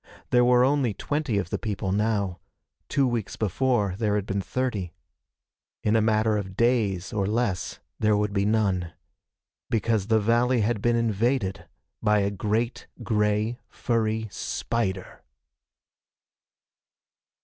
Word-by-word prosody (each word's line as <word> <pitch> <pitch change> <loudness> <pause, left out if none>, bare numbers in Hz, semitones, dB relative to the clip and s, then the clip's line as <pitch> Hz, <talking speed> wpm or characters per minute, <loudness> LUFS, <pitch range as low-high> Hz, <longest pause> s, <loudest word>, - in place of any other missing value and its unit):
There 125 0 +5
were 125 0 +5
only 135 -6 +1
twenty 145 -5 -1
of 90 -3 -2
the - - -1
people 100 -3 -3
now. 100 -3 0 0.5
Two 140 -1 +2
weeks 115 -5 -2
before 110 -1 +1
there 105 -3 +1
had 105 -2 -1
been 100 0 -1
thirty. 105 -7 -2 0.9
In 105 +1 +2
a 110 - +4
matter 110 0 +2
of 95 -2 -5
days 110 -7 +1
or 100 -2 0
less, 110 -4 -1 0.2
there 105 -1 +3
would 105 0 0
be 100 -1 +1
none. 100 -5 +1 0.8
Because 110 -2 0
the 110 -1 +4
valley 120 +3 +2
had 105 0 0
been 120 +1 +2
invaded 110 -5 0 0.3
by 105 -1 +3
a 100 0 0
great 110 +4 -2 0.2
gray 105 +2 0
furry 110 -2 -1
spider! 95 -6 -3
110 Hz, 130 wpm, -26 LUFS, 100-115 Hz, 0.9 s, There